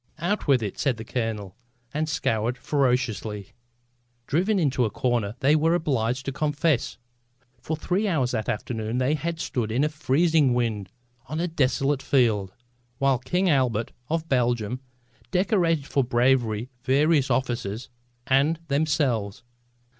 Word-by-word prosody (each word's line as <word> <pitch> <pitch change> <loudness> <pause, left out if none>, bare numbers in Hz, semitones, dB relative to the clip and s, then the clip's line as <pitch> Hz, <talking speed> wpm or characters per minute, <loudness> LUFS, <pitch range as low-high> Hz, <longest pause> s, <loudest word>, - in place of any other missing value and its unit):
"Out 175 +6 -1
with 130 -5 +4
it," 100 - -5
said 135 -5 +1
the 110 - -7
colonel, 110 -5 -3 0.4
and 155 +1 -1
scowled 115 -3 0
ferociously. 120 -8 -1 0.7
Driven 190 - +1
into 140 -7 +2
a 110 - +1
corner 120 -3 -1
they 145 +3 +4
were 165 +2 +3
obliged 130 -5 -1
to 135 - -2
confess. 150 -1 0 0.6
For 160 +5 -3
three 185 +7 0
hours 135 -10 +1
that 110 -3 -2
afternoon 110 +1 -3
they 130 +3 +2
had 165 +2 -3
stood 115 -8 -2
in 125 +6 +1
a 150 - +2
freezing 155 -2 +2
wind 110 -6 -1 0.4
on 155 - -3
a 175 - 0
desolate 140 -2 +1
field, 110 -10 +2 0.5
while 135 -2 +2
King 180 +8 0
Albert 125 - +1 0.2
of 165 0 -1
Belgium 120 -3 0 0.5
decorated 180 -5 +1
for 140 -1 +1
bravery 120 -1 +1
various 140 +2 +3
officers 120 -3 -2 0.4
and 140 +5 +2
themselves. 140 -9 0
130 Hz, 140 wpm, -25 LUFS, 115-155 Hz, 0.7 s, with